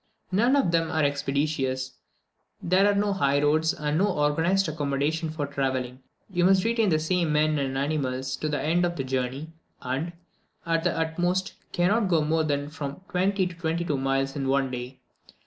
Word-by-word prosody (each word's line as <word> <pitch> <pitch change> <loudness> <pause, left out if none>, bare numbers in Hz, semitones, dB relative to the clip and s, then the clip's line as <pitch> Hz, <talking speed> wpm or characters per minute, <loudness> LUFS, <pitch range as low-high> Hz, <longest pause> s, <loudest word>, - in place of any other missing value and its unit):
None 235 +8 +3
of 270 -12 +2
them 165 -1 +1
are 155 -1 +1
expeditious; 140 -2 -1 0.7
there 190 +4 +3
are - - -1
no 200 0 +1
highroads, 145 -1 +2
and 150 +1 -1
no 200 - +3
organized 170 +3 +1
accommodation 150 +2 -1
for 155 -2 -3
travelling; 130 -2 -2 0.3
you 180 -3 0
must 190 0 +4
retain 230 -2 +2
the 155 - +3
same 165 +1 0
men 150 0 +2
and 135 -1 -2
animals 135 -2 -1
to 155 - -2
the 145 -1 -1
end 165 +5 +1
of 175 0 0
the 135 - -2
journey, 130 +4 -3 0.3
and, 140 +7 -3 0.5
at 165 -1 +1
the 175 - +1
utmost, 175 +3 0 0.2
cannot 200 +5 +2
go 165 -4 +2
more 160 +1 +1
than 145 -2 -1
from 145 0 -6
twenty 190 +1 +1
to 180 - -4
twenty 165 0 -2
two 150 - 0
miles 135 0 0
in 135 -2 -2
one 135 -1 +1
day. 125 +1 -6
155 Hz, 180 wpm, -26 LUFS, 140-175 Hz, 0.7 s, must